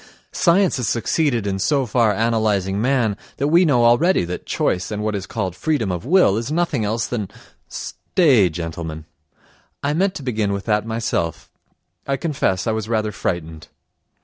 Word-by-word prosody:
"Science 180 0 +3
has 125 -4 -2
succeeded 120 -1 0
in 95 -1 -2
so 140 +5 +1
far 115 -1 +2
analysing 105 -3 0
man 120 -4 +1 0.2
that 140 - 0
we 170 +3 +5
know 125 -8 +3
already 120 - +4
that 90 +1 -6
choice 90 0 -1
and 105 0 -3
what 110 0 -1
is 95 -2 -4
called 90 -2 -3
freedom 145 -11 -1
of 90 +6 -5
will 175 - +4
is 115 +5 -3
nothing 160 -7 0
else 110 +2 -1
than—" 105 -6 -3 0.4
Stay, 130 - +2
gentlemen, 80 -1 -6 0.8
I 145 +1 +1
meant 190 +4 +1
to 145 - -6
begin 110 -5 -1
with 100 0 -4
that 105 0 0
myself 110 -8 -2 0.6
I 135 0 0
confess, 130 - -1
I 115 - +1
was 110 0 -3
rather 110 -2 0
frightened. 80 -5 -4
110 Hz, 170 wpm, -21 LUFS, 100-140 Hz, 0.8 s, we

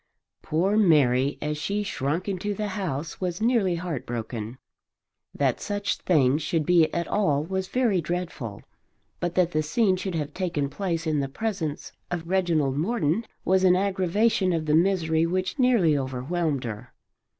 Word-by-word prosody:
Poor 185 +7 +1
Mary 140 - +4
as 150 0 -2
she 205 +6 -1
shrunk 165 -1 -2
into 200 +1 -2
the 210 +1 -3
house 165 -7 -4
was 180 -2 -2
nearly 220 -6 +2
heartbroken. 120 -8 -5 0.8
That 135 -4 0
such 205 0 -2
things 150 -4 +2
should 160 0 -1
be 170 -2 +4
at 170 0 -2
all 150 -9 +1
was 190 +3 -3
very 230 -7 +1
dreadful, 165 - -4 0.6
but 175 0 -2
that 180 -2 +3
the 155 - +1
scene 185 +5 +2
should 185 -1 -4
have 150 -2 -3
taken 160 -7 -2
place 170 0 -2
in 155 -2 +1
the 135 -1 -2
presence 175 -3 -3 0.2
of 170 -2 -4
Reginald 165 -7 +1
Morton 205 +2 0 0.2
was 190 0 +3
an 180 -1 +6
aggravation 190 +1 +1
of 160 -2 -1
the 150 - +1
misery 165 -2 +2
which 185 - -2
nearly 230 - +4
overwhelmed 140 +3 -1
her. 115 +1 -7
170 Hz, 155 wpm, -26 LUFS, 145-190 Hz, 0.8 s, an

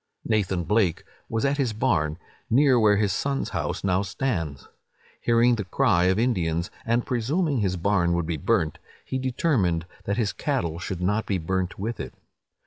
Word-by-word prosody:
Nathan 95 -5 0
Blake 95 -1 +1 0.3
was 115 +2 0
at 140 +1 +1
his 125 -5 +1
barn, 75 -7 +1 0.3
near 130 0 +5
where 105 -2 +4
his 100 -2 +1
son's 140 -1 -1
house - - -3
now 95 -1 +2
stands. 95 - -3 0.5
Hearing 120 +1 +4
the 105 - -2
cry 95 -3 +2
of 95 +1 +3
Indians, 85 -8 0 0.2
and 120 +1 +1
presuming 140 +5 0
his 95 -3 0
barn 90 -1 +2
would 85 -1 0
be 80 -1 -2
burnt, 90 -4 0 0.3
he 130 - -2
determined 120 - +1 0.2
that 100 - -1
his 105 -5 0
cattle 100 - -2
should 90 -1 -4
not 105 +5 0
be 100 - +1
burnt 90 +2 -2
with 110 +4 -4
it. - - -6
105 Hz, 170 wpm, -25 LUFS, 90-120 Hz, 0.5 s, near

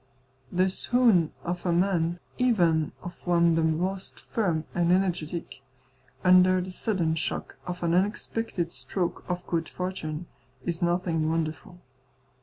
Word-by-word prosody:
The 185 +1 +3
swoon 220 -7 +3
of 175 0 -3
a 180 - +1
man, 175 -1 +1 0.2
even 175 -11 +3
of 175 - -6
one 170 -1 +4
the 165 - +2
most 180 +5 -1
firm 175 -8 -1
and 175 0 +2
energetic, 175 -3 -1 0.6
under 185 0 +6
the 185 +1 -4
sudden 180 -5 0
shock 160 - -3
of 180 0 -4
an 170 0 +2
unexpected 195 -1 -1
stroke 170 +7 -2
of 180 0 -2
good 165 -1 -1
fortune, 180 -3 -4 0.4
is 170 -1 -2
nothing 170 -2 +1
wonderful. 165 +3 -3
175 Hz, 130 wpm, -27 LUFS, 165-185 Hz, 0.6 s, under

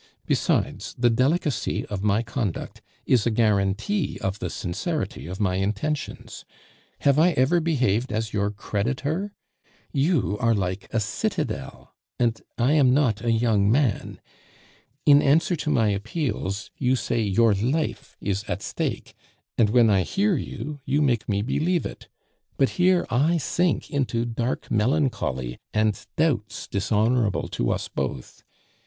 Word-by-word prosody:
Besides, - - 0
the 120 0 +3
delicacy 140 +3 0
of 100 -2 -5
my 105 +2 +2
conduct 110 -5 -4 0.2
is 120 -3 +3
a - - +4
guarantee 110 - +1
of 95 +1 -3
the 90 - -3
sincerity 95 - -3
of 90 +2 -6
my 95 -3 +1
intentions. 105 +10 -3 0.6
Have 140 +1 +4
I 175 +2 +5
ever 140 +7 +3
behaved 130 -8 +1
as 110 0 -2
your 100 -1 +1
creditor? 135 - -2 0.6
You 140 - +1
are 115 -2 +3
like 95 -1 -3
a 115 - +1
citadel, 100 - -3 0.3
and 115 -2 +1 0.2
I 125 +3 +2
am 135 -4 +5
not 120 -7 +1
a 120 - +1
young 110 -3 +2
man. 125 -4 0 0.9
In 145 -1 +7
answer 165 +5 +3
to 150 - -3
my 115 -7 +3
appeals, 105 - -3
you 130 0 +2
say 120 -2 -1
your 110 +2 +3
life 130 +11 -2
is 100 0 -2
at 100 0 -4
stake, - - -3 0.4
and 110 -3 +3
when 115 -1 +5
I 95 -2 +4
hear 195 - +1
you, 145 +1 -5
you 145 +3 +1
make 120 -6 0
me 100 0 +1
believe 165 +8 0
it; - - -7 0.5
but 135 - +3
here 180 0 +3
I 155 +8 +3
sink 175 +3 0
into 125 -5 0
dark 120 +2 -3
melancholy 105 - 0 0.2
and 110 -1 +1
doubts 120 -10 0
dishonorable 105 +1 +1
to - - -1
us - - -1
both. 65 - -5
115 Hz, 145 wpm, -25 LUFS, 105-145 Hz, 0.9 s, In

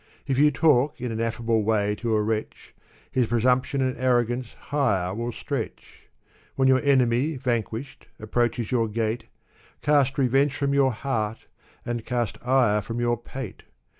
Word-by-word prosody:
If 135 -1 0
you 150 +1 +6
talk 150 -1 +2
in 125 -1 -3
an 110 - -4
af&ble 115 0 0
way 105 -1 +1
to 115 -2 0
a 105 - +2
wretch. 110 0 -4 0.4
His 125 -3 +1
presumption 125 +4 +1
and 130 -1 0
arrogance 120 -1 +1 0.2
higher 100 -11 +1
will 120 +3 -3
stretch. - - -6 0.5
When 135 -1 +3
your 130 0 +4
enemy, 135 +1 +2
vanquished, 125 0 -3
approaches 120 +1 -1
your 115 -3 +2
gate. 110 +2 -2 0.6
Cast 140 -2 +3
revenge 135 +2 +2
from 140 -1 0
your 135 -2 +4
heart 115 -3 -3 0.4
and 120 -1 -3
cast 120 -3 -2
ire 120 -5 +3
from 115 +3 -5
your 120 0 +2
pate! 120 -1 -8
120 Hz, 150 wpm, -25 LUFS, 115-135 Hz, 0.6 s, you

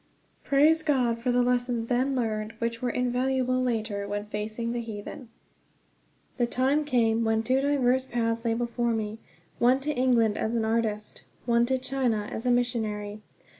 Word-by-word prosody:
Praise 305 +3 +4
God 250 -7 +1
for 245 +2 0
the 245 0 +3
lessons 245 -1 0
then 255 +3 0
learned, 220 -3 -2
which 230 0 -3
were 250 - 0
invaluable 255 +1 0
later 220 -5 -2
when 205 0 -3
facing 215 +2 -4
the 240 0 -2
heathen. 225 +2 -8 1.1
The 240 -2 +2
time 270 +5 +1
came 230 -4 +2
when 220 0 +1
two 260 +3 +2
diverse 260 -2 +2
paths 230 -1 -1
lay 230 -1 +1
before 235 0 -1
me 215 0 -4 0.4
one 250 +2 +4
to 300 +2 -1
England, 245 -5 +2
as 225 +2 -1
an 225 -1 +1
artist; 220 -2 -1 0.2
one 235 0 +3
to 260 +1 +1
China, 250 -5 -1
as 230 +3 -4
a - - +4
missionary. 215 -4 -1
235 Hz, 165 wpm, -27 LUFS, 225-255 Hz, 1.1 s, Praise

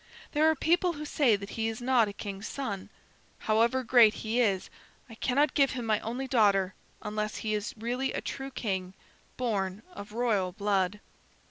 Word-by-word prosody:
There 310 +1 +4
are 320 - +2
people 345 +4 +2
who 300 -1 -6
say 270 -7 +3
that 200 0 -7
he 225 -1 -1
is 225 +1 -4
not 245 -2 +3
a 200 - -6
king's 200 0 -6
son. 205 -9 -4 0.5
However 230 +4 +2
great 230 -3 +6
he 225 +2 -2
is, 195 -5 0 0.4
I 230 - -12
cannot 270 +6 +1
give 275 -2 +3
him 245 -2 -4
my 215 -2 +2
only 245 +4 -4
daughter 200 -6 +3 0.3
unless 210 0 -3
he 215 - 0
is 210 +1 -3
really 245 +4 -2
a - - -2
true 270 0 -5
king, 190 -7 -3 0.4
born 205 -5 -2
of 205 - -9
royal 215 -6 0
blood." 200 0 0
225 Hz, 175 wpm, -29 LUFS, 200-255 Hz, 0.5 s, great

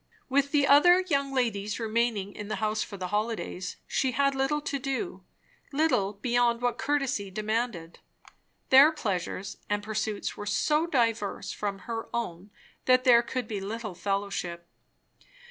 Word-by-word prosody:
With 280 +1 +2
the 285 -1 +3
other 350 +7 +7
young 280 -6 0
ladies 215 -5 -1
remaining 225 -3 0
in 205 - -7
the 215 - -2
house 215 0 -1
for 200 - -5
the 185 -1 -4
holidays, 210 -3 -2
she 260 -2 0
had 275 +2 +2
little 270 +2 0
to 285 -1 -3
do; 275 +8 -3 0.5
little 270 -10 +1
beyond 235 +2 +1
what 245 0 -1
courtesy 275 -9 0
demanded. 215 -4 -3 0.7
Their 275 +4 +9
pleasures 195 - -3
and 205 0 0
pursuits 215 -1 -3
were 205 - -7
so 300 +9 +1
diverse 230 - 0
from 200 -1 -4
her 225 -1 -4
own 195 -4 -4 0.4
that 255 0 +5
there 240 -2 +7
could 245 0 -4
be 210 -3 -4
little 215 +1 -5
fellowship. 190 -3 -3
230 Hz, 145 wpm, -28 LUFS, 205-270 Hz, 0.7 s, Their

